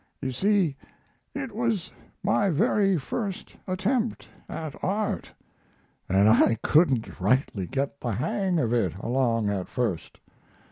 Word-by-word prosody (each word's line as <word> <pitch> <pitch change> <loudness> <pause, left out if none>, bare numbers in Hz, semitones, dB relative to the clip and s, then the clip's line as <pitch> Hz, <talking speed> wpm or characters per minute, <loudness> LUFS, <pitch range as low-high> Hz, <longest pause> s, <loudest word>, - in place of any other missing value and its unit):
You 130 -1 -3
see, 190 - +2 0.6
it 270 -3 -4
was 225 -5 -1 0.3
my 200 0 +2
very 195 +4 +3
first 195 - -4
attempt 220 +5 -1 0.2
at 155 -3 -5
art, 205 +3 -1 0.8
and 95 +2 +4
I 115 0 +5
couldn't 135 -11 +2
rightly 100 -2 +1
get 140 +4 -3
the 120 -3 -1
hang 180 - 0
of 120 -7 +1
it 95 -8 +1
along 115 -1 0
at 95 -3 -3
first. 110 -10 -3
140 Hz, 125 wpm, -26 LUFS, -, 0.8 s, I